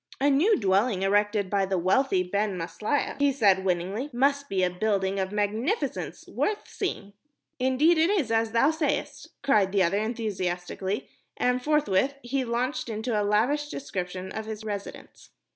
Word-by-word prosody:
"A 285 +2 +3
new 350 +11 +4
dwelling 195 0 +1
erected 205 +1 +2
by 195 0 0
the 190 0 0
wealthy 185 +3 +2
Ben 200 +1 -1
Maslia," 180 - -2
he 285 0 +4
said, 200 -8 +3
winningly, 190 +8 -1
"must 280 +3 +1
be 190 -1 +1
a 180 - +3
building 195 0 0
of 190 0 -2
magnificence, 215 - -2
worth 425 0 -2
seeing." 205 - -4 0.5
"Indeed 275 +6 +3
it 325 +3 +4
is 345 - +1
as 225 0 +1
thou 235 +7 +4
sayest," 315 -1 -2 0.2
cried 210 -9 +3
the 195 -1 +3
other 190 +4 +1
enthusiastically, 200 -3 -3 0.3
and 250 0 +1
forthwith 280 -4 +2
he 260 +2 -1
launched 250 +1 -2
into 220 +2 -3
a 210 - +2
lavish 240 +9 +1
description 185 -8 -5
of 220 0 -5
his 220 0 -6
residence. 205 -2 -7
215 Hz, 160 wpm, -27 LUFS, 195-270 Hz, 0.5 s, new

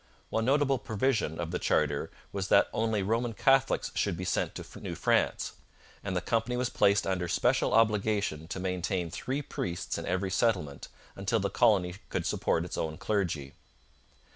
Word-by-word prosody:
One 110 0 0
notable 135 0 +3
provision 110 - 0
of 85 -1 -3
the 90 - -2
charter 75 -2 +1 0.2
was 100 -1 -3
that - - +4
only 110 -2 0
Roman 115 +3 0
Catholics 135 +3 +2
should 85 - 0
be 90 - -4
sent - - -1
to - - -9
New - - -5
France, - - +1 0.5
and 100 -2 -3
the 90 - +1
company 115 +3 0
was 125 0 -1
placed 100 0 +3
under 90 -2 -1
special 125 +9 +2
obligation 105 -7 +2
to 95 - -5
maintain 90 -2 -2
three 135 - -3
priests 90 -7 -3
in 85 - -6 0.2
each 95 - -3
settlement 75 -12 0 0.3
until - - 0
the - - -1
colony 95 -7 +3 0.2
could - - -2
support 80 - 0
its 90 - -5
own 80 -1 -2
clergy. 85 -10 -1
100 Hz, 165 wpm, -30 LUFS, 90-115 Hz, 0.5 s, that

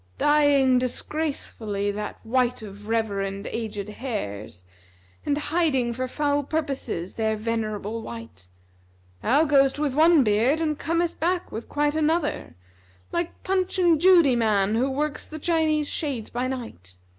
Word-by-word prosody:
Dyeing 285 -4 +4
disgracefully 245 -7 -3
that 210 +1 -5
white 245 0 +1
of 205 0 -10
reverend 200 -3 -1
aged 215 -3 -4
hairs, 110 - -5 0.3
* 95 0 -32
And 285 - +2
hiding 295 -6 +1
for 255 +2 -3
foul 290 +2 0
purposes 275 - -3
their 220 -1 0
venerable 220 0 -3
white! 115 - -10 0.7
Thou 280 +7 +3
goest 275 -2 +4
with 295 -3 -1
one 315 0 +5
beard 230 +8 +2
and 305 -2 -1
comest 335 +1 -1
back 350 +2 -1
with 225 - -7
quite 295 0 +1
another, 310 - 0 0.3
* 95 0 -32
Like 340 0 -3
Punch 375 0 0
and 340 -4 +3
Judy 340 -8 +6
man 210 -3 +2
who 250 +4 +1
works 295 +2 -2
the 310 - -7
Chinese 310 -2 +1
shades 270 -10 -3
by 245 +2 -1
night. 95 - -7
255 Hz, 145 wpm, -25 LUFS, 210-300 Hz, 0.7 s, Judy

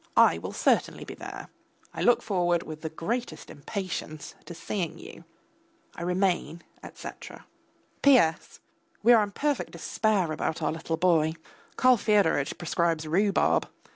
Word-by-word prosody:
I - - +6
will - - -6
certainly - - +1
be - - -8
there. - - -9 0.4
I - - -5
look 245 - +4
forward 175 -4 +1
with 155 -1 -8
the 160 - -4
greatest 165 +1 -4
impatience 155 -2 -6
to 170 - -9
seeing 170 -2 -4
you. 400 +6 -12 0.7
I - - -9
remain, 180 -1 -1 0.2
etc. - - -10 0.6
P.S. 245 - +3 0.4
We 240 +3 +7
are 225 - +6
in 205 - -1
perfect 290 +6 -2
despair 205 -7 0
about 155 0 -2
our 155 -2 0
little 160 0 -3
boy. 160 -2 +2 0.4
Karl 255 -1 +5
Fyodoritch 200 -10 +2
prescribes 165 -2 -1
rhubarb. 195 +5 +2
175 Hz, 140 wpm, -27 LUFS, 160-210 Hz, 0.7 s, We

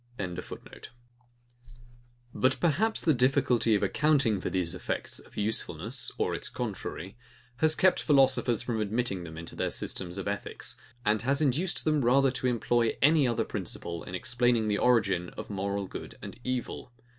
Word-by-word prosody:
] 120 - -30 2.2
But 130 +1 +2
perhaps 185 +7 +1
the 160 - +3
difficulty 125 -3 +3
of 100 - 0
accounting 140 -10 +2
for - - -2
these 90 -3 0
effects - - -3
of - - -17
usefulness, 105 +1 -2
or - - 0
its - - -4
contrary, 95 +5 -5 0.4
has 155 +3 +3
kept 185 -1 +3
philosophers 135 -5 +3
from 115 -3 -1
admitting 105 -3 -1
them 80 -1 -9
into 85 0 -8
their - - -1
systems 90 0 -2
of 95 - -4
ethics, - - -4 0.3
and 105 0 +2
has 135 +4 +1
induced 155 +5 +1
them 155 -3 +2
rather 135 +2 +4
to 130 0 -2
employ 120 -1 +1
any 150 -2 +5
other 120 - 0
principle, 85 -1 -3
in 90 - -6
explaining 120 +2 +1
the 105 - +1
origin 95 -8 +2
of - - -6
moral 100 0 -2
good - - -8
and - - -8
evil. 125 -1 -4
120 Hz, 155 wpm, -29 LUFS, 100-135 Hz, 2.2 s, any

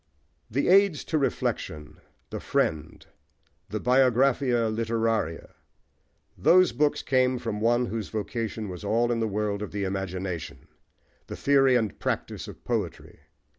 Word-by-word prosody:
The 135 +6 0
Aids 195 -3 +4
to 155 - +1
Reflection, 110 - -3 0.3
The - - -4
Friend, 80 0 -2 0.6
The - - -3
Biographia 125 -2 +2
Literaria: 115 -6 -1 0.8
those 185 +1 +5
books 145 +5 +1
came 130 -1 +2
from 115 -3 -4
one 120 +2 +3
whose 110 -3 -4
vocation 110 0 -4
was 90 0 -7
in 115 +3 +1
the 110 - 0
world 105 0 -2
of 105 - -5
the 100 -1 -3
imagination, 95 -3 -4 0.6
the - - -6
theory 135 -2 +4
and 110 -5 -1
practice - - -3
of - - -11
poetry. - - -4
115 Hz, 130 wpm, -26 LUFS, 105-130 Hz, 0.8 s, those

